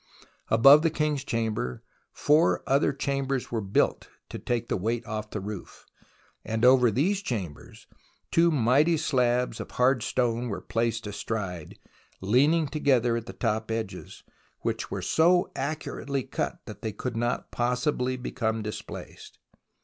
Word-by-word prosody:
Above 135 +7 +8
the 165 - +2
King's 150 -3 -1
Chamber 110 - -2 0.3
four 145 - +3
other 140 +2 +2
chambers 135 -1 -2
were 115 -2 -1
built 100 0 0 0.2
to - - -6
take 120 -1 -2
the - - 0
weight 115 +5 -2
off 110 -1 -5
the 105 - -4
roof, 100 -1 -8 0.6
and 110 +2 0
over 125 -1 +6
these 180 - +1
chambers 100 - -6 0.5
two 170 +1 +4
mighty 150 +4 +3
slabs 125 -4 +1
of - - -6
hard 125 0 +2
stone 120 0 0
were 100 -4 -3
placed 115 +3 -2
astride, 100 -5 -5 0.4
leaning 145 - +3
together 130 -5 +2
at 115 -1 -4
the - - -5
top 110 +1 -2
edges, 110 -5 -5 0.4
which - - -2
were - - -4
so 175 +2 +3
accurately 140 -1 -3
cut - - -3
that - - -10
they 110 - -3
could 120 +3 -5
not 120 +2 -2
possibly 125 +1 0
become 115 -3 -2
displaced. 105 0 -8
120 Hz, 140 wpm, -27 LUFS, 110-140 Hz, 0.6 s, Above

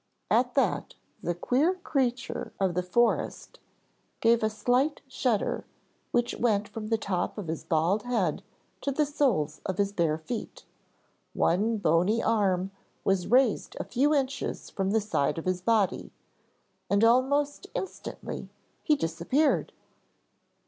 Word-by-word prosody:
At - - +3
that - - +1 0.3
the 175 - -1
queer 280 - +2
creature 260 -8 -2
of 190 -3 +1
the 180 - 0
forest 235 +7 0 0.6
gave 230 0 +4
a 215 - +2
slight 245 +7 +1
shudder 250 -5 0 0.5
which 240 0 +1
went 210 -3 +2
from 215 -1 -6
the 225 0 +2
top 195 -3 -2
of 205 -5 -5
his 160 0 -4
bald 170 +6 +1
head 210 -10 0 0.4
to 280 - -1
the 300 +2 +2
soles 235 - 0
of 190 -2 -3
his 200 -1 +1
bare 165 -5 +1
feet, 210 +8 -6 0.7
one 215 +6 +2
bony 180 +4 +2
arm 195 -4 +1 0.3
was 190 -2 +1
raised 250 0 +2
a - - -1
few 275 +4 +1
inches 275 -2 -1
from 195 -1 -1
the 220 +2 +2
side 200 -10 0
of 165 - -5
his 185 -1 0
body, 215 -1 +1 0.8
and 200 +2 +3
almost 270 +5 +3
instantly 385 - -6 0.3
he 305 - +3
disappeared. 175 - +1
215 Hz, 135 wpm, -28 LUFS, 185-255 Hz, 0.8 s, gave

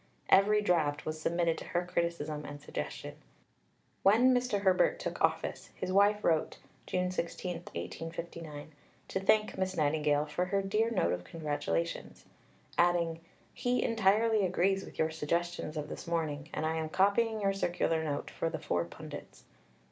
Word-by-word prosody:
Every 210 +2 +5
draft 155 -6 +1
was 155 0 -4
submitted 170 0 +1
to - - -7
her 175 0 -1
criticism 170 -4 -2
and 145 0 -7
suggestion. 75 - -6 0.8
When 235 +6 +6
Mr. 245 -5 +1
Herbert 190 -2 +3
took - - -5
office, - - 0
his 185 - -3
wife 205 +2 +4
wrote 160 -2 +1 0.3
(June 180 0 0
16, 180 0 -3 0.2
1859) 165 - -6 0.4
to 190 - -1
thank 215 +1 +2
Miss 190 -1 -1
Nightingale 150 -1 +2
for 155 +4 -1
her 195 +2 0
"dear 215 +4 +1
note 225 - +1
of 90 0 -4
congratulations," 145 - -3 0.5
adding, 170 -1 +3 0.3
"He 245 0 0
entirely 220 0 +3
agrees 190 +1 +2
with - - -12
your 160 0 +1
suggestions 165 +1 -2
of 150 -1 -3
this - - -8
morning, 155 -3 -2
and - - -2
I 160 +1 0
am 160 -1 -2
copying 215 +5 +2
your 195 -1 +1
Circular 175 -4 0
Note 145 -2 -3
for 165 - -1
the 160 - -3
four 90 - -1
pundits." 85 - -10
170 Hz, 155 wpm, -32 LUFS, 155-195 Hz, 0.8 s, When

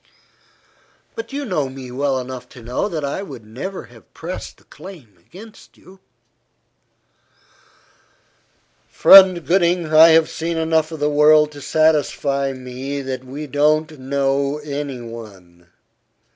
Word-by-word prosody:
"But 225 +2 -8
you 285 +1 -4
know 155 - -2
me 130 -1 -10
well 135 +1 -1
enough 130 0 -7
to 120 - -14
know 125 - -3
that 155 -6 -4
I 140 +7 -4
never 135 - -8
would - - -16
have - - -19
pressed - - -8
the - - -25
claim 155 - -14
against 205 - -16
you." 190 +1 -18 2.9
"Friend 185 -4 +7
Gooding, 175 -3 +1
I 160 +1 +9
have 160 0 +4
seen 165 +1 -4
enough 160 0 0
of 160 - -7
the 145 - 0
world 150 +1 +4
to 145 -1 -12
satisfy 145 -3 0
me 130 +2 -6
that 130 -1 -5
we 140 +4 -8
don't 155 +2 0
know 140 +1 -1
any 140 -3 -5
one. 100 -7 -12
145 Hz, 130 wpm, -19 LUFS, 130-160 Hz, 2.9 s, I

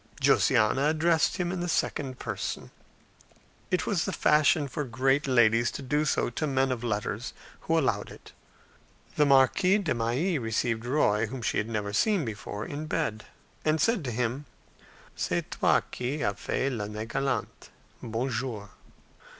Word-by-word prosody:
Josiana 130 +7 +3
addressed 160 0 +2
him 175 -1 -1
in 185 - -3
the 175 0 -2
second 135 -5 -1
person; 105 -6 -5 1.0
it 180 -2 0
was 195 -6 0
the - - -2
fashion 150 0 +3
for 150 +2 -3
great 135 +3 +1
ladies 120 -2 +4
to 140 - -7
do 150 +4 0
so 135 - 0
to 155 +6 -2
men 135 -1 +1
of 120 -2 -3
letters, 110 +1 -3 0.3
who 165 - 0
allowed 145 -5 0
it. - - -13 0.8
The 150 - +3
Marquise 160 +9 +4
de 165 - 0
Mailly 130 +9 0
received 115 0 -1
Roy, 110 -6 +2
whom 125 +1 -7
she - - 0
had 105 - -3
never 105 -2 -3
seen 200 - +2
before, 105 -1 -5
in 150 +2 -5
bed, 140 -10 -2 0.4
and 155 +1 +2
said 225 -3 +2
to 125 - -2
him, 125 +4 -2 0.7
"C'est - - -2
toi - - +3
qui 135 +5 -3
as 100 - +1
fait 135 +1 -1
l'Année 105 -1 -4
galante! 135 +2 -3 0.3
Bonjour." 115 -3 -3
130 Hz, 155 wpm, -28 LUFS, 115-155 Hz, 1.0 s, ladies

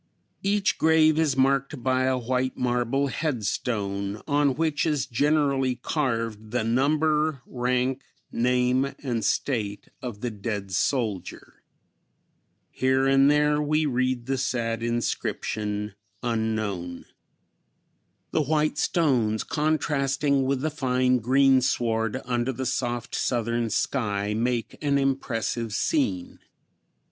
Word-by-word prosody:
Each 200 0 +1
grave 160 -1 +4
is 150 -4 +1
marked 135 0 +1
by 130 0 +2
a 130 0 +1
white 130 +1 -1
marble 125 +2 0
headstone, 105 - -2
on 145 -2 +2
which 155 0 0
is 150 -5 0
generally 140 0 +1
carved 115 -5 -2
the 120 0 -1
number, 150 +3 +1
rank, 125 +1 -1 0.3
name 125 +2 +1
and 120 -5 -2
state 105 -4 -1
of 120 -5 -6
the 120 - -2
dead 100 -2 -4
soldier. 110 -1 -2 1.1
Here 130 +1 +1
and 135 +1 +5
there 150 0 +3
we 155 +1 +1
read 130 -2 0
the 135 0 -1
sad 115 -3 -1
inscription, 105 -3 -2 0.3
"Unknown." 110 -7 -2 1.3
The 160 - +2
white 150 +1 0
stones 125 -13 +1
contrasting 140 -2 0
with 135 -1 0
the 155 +2 -1
fine 130 -3 +1
greensward 125 -2 +2
under 120 +1 0
the 130 +1 -4
soft 120 0 -2
Southern 115 -1 0
sky 105 -2 -1
make 120 +1 -1
an 140 -1 +2
impressive 120 -4 -1
scene. 270 - -1
130 Hz, 110 wpm, -25 LUFS, 115-140 Hz, 1.3 s, and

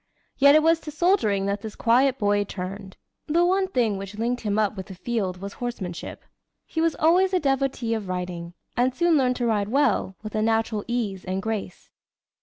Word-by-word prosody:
Yet 280 +1 +6
it 310 - +5
was 325 0 +4
to 315 - -8
soldiering 300 - +2
that 200 +1 -1
this 220 -1 -7
quiet 255 +3 +3
boy 205 -2 +2
turned. 190 0 -7 0.3
The 340 +3 +3
one 380 +2 +2
thing 230 - 0
which 195 +1 -8
linked 240 +2 -1
him 210 -2 -1
up 215 -1 +1
with 190 -2 -7
the 190 - -9
field 190 -2 -2
was 200 +1 -7
horsemanship. 195 -8 -5 0.4
He 320 - -3
was 330 -1 +2
always 365 +4 +3
a - - +3
devotee 270 -5 0
of 215 -4 -4
riding, 180 -1 -4 0.2
and 250 +1 +1
soon 345 +1 +3
learned 255 -3 +2
to 245 - -2
ride 210 -3 0
well, 265 -7 +1
with 215 - -7
a 215 - 0
natural 225 -1 0
ease 220 -6 -2
and 185 +1 -2
grace. 210 -3 -5
225 Hz, 200 wpm, -25 LUFS, 200-275 Hz, 0.4 s, Yet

